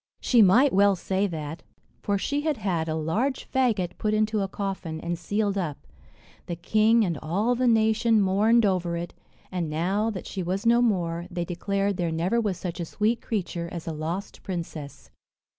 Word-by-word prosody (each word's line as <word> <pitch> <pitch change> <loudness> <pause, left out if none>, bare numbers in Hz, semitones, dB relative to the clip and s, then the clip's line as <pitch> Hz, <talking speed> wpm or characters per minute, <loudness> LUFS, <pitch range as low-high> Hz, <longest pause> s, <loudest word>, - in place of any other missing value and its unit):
She 240 -3 +4
might 235 +8 +5
well 200 +1 +5
say 190 +2 0
that, 160 -2 -6 0.4
for 200 -1 0
she 285 +8 -1
had 305 -2 0
had 170 -5 -1
a 155 - -1
large 210 - -1
faggot 220 -9 0
put 215 0 +1
into 215 0 +1
a 195 - 0
coffin, 190 -5 -4
and 170 +1 -3
sealed 200 +3 -1
up; 150 - -4 0.6
the 175 - -3
king 215 +6 +3
and 170 -6 -2
all 200 +10 +1
the 250 +1 +1
nation 225 0 +3
mourned 210 +4 +4
over 180 -3 0
it; 170 0 -5 0.4
and 175 -4 -2
now, 190 +8 0
that 195 -5 -5
she 190 - -4
was 185 +5 -2
no 235 +1 +5
more, 175 -6 0
they 175 -1 -3
declared 195 +3 -1
there 170 -3 -1
never 180 +9 +1
was 200 -5 -1
such 180 -1 -5
a 170 - -2
sweet 215 +7 0
creature 175 -5 -3
as 170 -2 -6
the 165 - -3
lost 165 +6 -5
princess. 165 -5 -6
195 Hz, 185 wpm, -26 LUFS, 170-220 Hz, 0.6 s, might